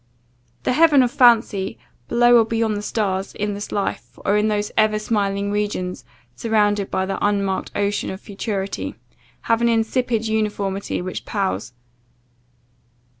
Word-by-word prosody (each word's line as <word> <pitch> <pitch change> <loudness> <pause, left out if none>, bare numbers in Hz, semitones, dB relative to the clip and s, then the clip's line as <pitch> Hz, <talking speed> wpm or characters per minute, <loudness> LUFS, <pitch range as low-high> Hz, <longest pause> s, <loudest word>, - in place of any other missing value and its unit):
The - - +1
heaven 300 -2 +6
of 245 - 0
fancy, 230 -6 +3 0.3
below 240 0 +5
or - - +5
beyond 225 -1 0
the 205 - -3
stars, 195 -3 -2
in 210 0 -2
this 205 +1 -6
life, 200 -1 -3
or 200 - +3
in 210 +1 +2
those 210 -1 -1
ever 215 0 +3
smiling 200 -2 -1
regions 185 - -2 0.3
surrounded 205 - +1
by 190 - 0
the 195 - -3
unmarked 200 -2 0
ocean 205 0 0
of 190 - -6
futurity, 195 - -4 0.5
have 230 0 +1
an 235 - +3
insipid 230 0 0
uniformity 205 -4 -1
which 185 - -5
palls. 195 - -2
210 Hz, 140 wpm, -21 LUFS, 195-225 Hz, 0.5 s, heaven